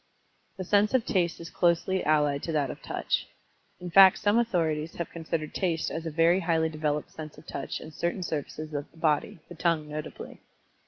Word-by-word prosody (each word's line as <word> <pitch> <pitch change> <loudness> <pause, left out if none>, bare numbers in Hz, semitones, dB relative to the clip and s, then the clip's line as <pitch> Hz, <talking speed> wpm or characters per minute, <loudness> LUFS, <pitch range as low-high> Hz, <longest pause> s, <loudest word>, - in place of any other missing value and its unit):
The 185 - -3
sense 205 +5 +3
of 250 - +2
Taste 175 -4 0
is 165 0 -9
closely 175 +2 +1
allied 150 -2 +2
to 165 - -3
that 145 -4 +1
of - - -10
Touch - - -2 0.5
in 180 -1 -7
fact 190 +1 +8
some 205 +3 +3
authorities 165 -8 0
have 170 - -4
considered 160 -2 -4
Taste 170 -4 -1
as 165 0 -4
a - - -1
very 165 +3 +3
highly 165 -2 +1
developed 150 -1 -2
sense 155 -2 -9
of 150 - -14
Touch - - -5
in 155 - -10
certain 175 +4 -2
surfaces 155 -1 -5
of 145 -1 -4
the - - -23
body, 155 -1 +1
the 175 - -10
tongue 165 -2 0
notably. 150 0 -7
165 Hz, 195 wpm, -28 LUFS, 155-175 Hz, 0.5 s, fact